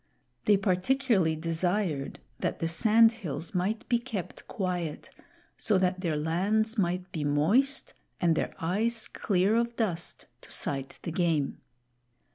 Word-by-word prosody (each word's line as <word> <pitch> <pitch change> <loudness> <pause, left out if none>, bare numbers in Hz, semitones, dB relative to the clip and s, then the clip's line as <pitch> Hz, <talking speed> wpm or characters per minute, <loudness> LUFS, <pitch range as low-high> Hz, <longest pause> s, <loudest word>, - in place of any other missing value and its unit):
They 205 -1 +5
particularly 195 -1 +2
desired 165 -1 -1 0.2
that - - -1
the 165 - -1
sand 220 +7 +5
hills 170 - -5
might 195 +5 -1
be 240 -2 +2
kept 230 -7 -6
quiet, 180 -7 -3 0.5
so 210 -3 +2
that 185 0 +1
their 165 -5 0
lands 200 +9 +1
might 180 -2 -1
be 155 - -3
moist 205 - +2 0.3
and 170 -2 +3
their - - -1
eyes 220 +7 -1
clear 195 +1 +1
of 235 0 0
dust 180 -8 -2 0.2
to - - -16
sight 135 -1 -2
the 170 - -3
game. 160 -5 0
185 Hz, 135 wpm, -29 LUFS, 165-220 Hz, 0.5 s, They